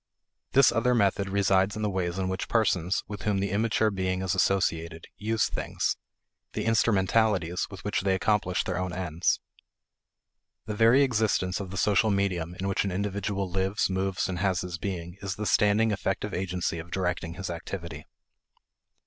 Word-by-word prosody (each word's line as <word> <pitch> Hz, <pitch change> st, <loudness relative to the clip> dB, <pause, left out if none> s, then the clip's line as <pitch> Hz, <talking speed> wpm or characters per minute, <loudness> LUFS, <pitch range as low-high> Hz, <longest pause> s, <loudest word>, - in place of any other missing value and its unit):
This 135 Hz, -1 st, +6 dB
other 125 Hz, +2 st, +2 dB
method 100 Hz, -2 st, +2 dB
resides 95 Hz, 0 st, +2 dB
in 110 Hz, -, -3 dB
the -, -, +2 dB
ways 90 Hz, -1 st, -2 dB
in 95 Hz, -1 st, -1 dB
which 95 Hz, 0 st, -3 dB
persons, 95 Hz, -6 st, +1 dB
with 105 Hz, -1 st, -7 dB
whom 105 Hz, -2 st, 0 dB
the 100 Hz, 0 st, -1 dB
immature 110 Hz, +1 st, +2 dB
being 95 Hz, -1 st, -1 dB
is 95 Hz, -2 st, 0 dB
associated, 85 Hz, -4 st, 0 dB
use 110 Hz, +1 st, 0 dB
things; -, -, -2 dB, 0.6 s
the -, -, -2 dB
instrumentalities 105 Hz, -4 st, +2 dB
with 95 Hz, -3 st, -10 dB
which 105 Hz, -, -1 dB
they 95 Hz, 0 st, +2 dB
accomplish 95 Hz, -2 st, +1 dB
their -, -, -2 dB
own 90 Hz, -1 st, -3 dB
ends. 85 Hz, -2 st, 0 dB, 1.3 s
The 105 Hz, -, -4 dB
very 115 Hz, +6 st, +5 dB
existence 105 Hz, -7 st, +1 dB
of 100 Hz, -2 st, -5 dB
the 95 Hz, -, -6 dB
social 105 Hz, +2 st, +3 dB
medium 90 Hz, -4 st, 0 dB
in 95 Hz, -, -2 dB
which 100 Hz, -, +1 dB
an 100 Hz, -, -1 dB
individual 100 Hz, 0 st, -2 dB
lives, 95 Hz, +2 st, 0 dB
moves, 95 Hz, +1 st, -1 dB
and 90 Hz, -2 st, -3 dB
has 95 Hz, -2 st, +1 dB
his 90 Hz, -1 st, -5 dB
being 90 Hz, -2 st, -5 dB
is 95 Hz, -2 st, -3 dB
the 105 Hz, -, -4 dB
standing 105 Hz, +3 st, +3 dB
effective 100 Hz, 0 st, -2 dB
agency 90 Hz, -2 st, -2 dB
of 80 Hz, +1 st, -9 dB
directing 90 Hz, -2 st, -2 dB
his 95 Hz, -1 st, -4 dB
activity. 85 Hz, -2 st, -6 dB
95 Hz, 170 wpm, -27 LUFS, 90-105 Hz, 1.3 s, This